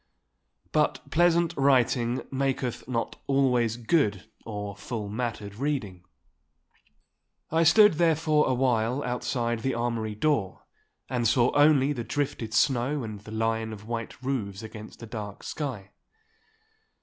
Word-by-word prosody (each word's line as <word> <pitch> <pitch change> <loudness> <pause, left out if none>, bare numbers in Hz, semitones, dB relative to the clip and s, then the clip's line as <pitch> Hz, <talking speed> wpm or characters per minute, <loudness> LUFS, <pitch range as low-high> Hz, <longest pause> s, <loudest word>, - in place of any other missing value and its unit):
But - - 0
pleasant 170 0 +3
writing 130 -3 +2
maketh 135 -3 -2
not 120 -2 -3
always 125 -4 +2
good 115 - +1 0.2
or 105 -2 -5
full 105 0 -5
mattered 110 -2 -4
reading. 110 -8 -3 1.5
I 160 +1 +3
stood 210 +5 +7
therefore 155 -2 +2
awhile 125 0 +1
outside 120 -1 -1
the 130 +2 -1
armoury 115 -2 -2
door 110 -6 0 0.4
and 120 -2 0
saw 120 +2 +3
only 145 -1 +5
the 120 -4 -4
drifted 125 -3 -3
snow 130 +4 +2
and 110 -2 -6
the 105 +2 -12
line 110 0 -1
of 105 -1 -9
white 115 0 -5
roofs 110 -6 -3
against 110 +1 -10
a - - -5
dark 105 -3 -7
sky. 115 -10 -5
120 Hz, 125 wpm, -27 LUFS, 110-140 Hz, 1.5 s, stood